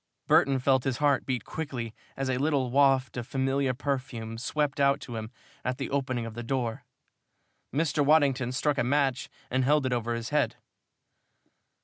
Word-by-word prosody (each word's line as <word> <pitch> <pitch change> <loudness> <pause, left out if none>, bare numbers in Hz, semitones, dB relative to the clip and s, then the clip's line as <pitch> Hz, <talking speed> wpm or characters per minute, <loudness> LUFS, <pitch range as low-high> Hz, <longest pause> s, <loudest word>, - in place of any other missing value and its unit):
Burton 135 -1 +4
felt 130 0 +2
his 130 -3 -1
heart 145 -2 +2
beat 125 -5 -2
quickly 125 -8 -5 0.2
as 135 0 -1
a 130 -1 0
little 140 -4 +1
waft 135 -1 +3
of 120 -1 -4
familiar 135 0 0
perfume 125 -4 -3
swept 145 +3 -1
out 140 0 +4
to 120 - -8
him 110 -1 -5 0.3
at 125 0 -2
the - - -4
opening 130 -4 -1
of 115 - -6
the 120 - -6
door. 120 -1 -2 0.9
Mr. 150 0 +1
Waddington 140 -4 +3
struck 145 +2 0
a - - +3
match 135 0 +1 0.2
and 130 +1 +2
held 145 +1 +3
it 130 - 0
over 120 -1 -1
his 115 0 -4
head. 150 0 +1
130 Hz, 170 wpm, -28 LUFS, 120-140 Hz, 0.9 s, Burton